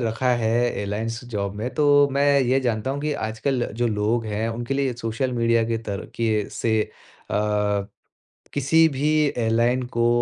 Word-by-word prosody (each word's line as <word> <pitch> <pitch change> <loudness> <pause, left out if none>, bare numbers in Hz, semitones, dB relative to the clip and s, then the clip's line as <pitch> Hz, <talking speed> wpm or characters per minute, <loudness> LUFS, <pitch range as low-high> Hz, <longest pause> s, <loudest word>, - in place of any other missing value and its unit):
रखा 120 +2 0
airlines 115 0 -1
job 100 -1 -2
में, 110 +4 -3
तो 145 -1 +5
मैं 140 0 +3
ये 130 +1 +2
जानता 120 -1 -1
हूँ 140 +1 -3
कि 150 0 -1
आजकल 120 +2 -2 0.2
जो 120 - +3
लोग 110 +1 0
हैं, 110 +1 -2
उनके 120 +3 -3
लिए 135 -2 0
सोशल 115 +3 -2
मीडिया 115 -1 +2
के 115 - 0
तरीके 105 +1 -2
से 115 - -1 0.6
आ, - - 0 1.2
किसी 160 +4 +4
भी 145 +1 -1 0.3
एयरलाइन 120 +2 +2 0.2
को 120 0 +3
120 Hz, 155 wpm, -23 LUFS, 110-135 Hz, 1.2 s, तो